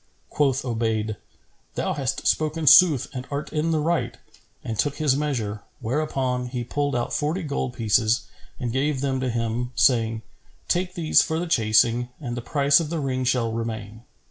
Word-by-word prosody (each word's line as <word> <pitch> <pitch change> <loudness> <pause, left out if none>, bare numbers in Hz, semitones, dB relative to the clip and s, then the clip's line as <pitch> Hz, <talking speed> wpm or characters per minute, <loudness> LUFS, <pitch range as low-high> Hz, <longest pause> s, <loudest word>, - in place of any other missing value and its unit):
Quoth 140 -2 +1
Obayd, 110 -3 -1 0.6
"Thou - - -1
hast - - -3
spoken 155 +1 +1
sooth 150 -2 +7
and 130 -1 -6
art 145 +1 -5
in 155 +1 0
the 160 - +1
right;" 150 -7 -1 0.5
and 110 -2 -5
took 145 +4 +1
his 150 -4 +2
measure, 120 -8 -2 0.2
whereupon 130 -1 -1
he 125 -1 -4
pulled 145 +2 -2
out 120 - -2
forty 160 +5 -1
gold 140 -4 -3
pieces 110 0 +2 0.4
and 120 -3 -3
gave 135 +1 0
them 135 -2 -1
to 130 -1 -1
him, 115 +1 -2
saying, 115 -3 +2 0.4
"Take 180 +1 0
these 160 -3 +4
for 160 - -1
the 175 - -2
chasing 120 -4 +2
and 120 -6 -5
the 120 - -4
price 140 +2 +3
of 160 -3 -3
the 165 0 -2
ring 130 -2 -2
shall 120 -2 +1
remain." 110 -1 -5
130 Hz, 170 wpm, -24 LUFS, 115-150 Hz, 0.6 s, sooth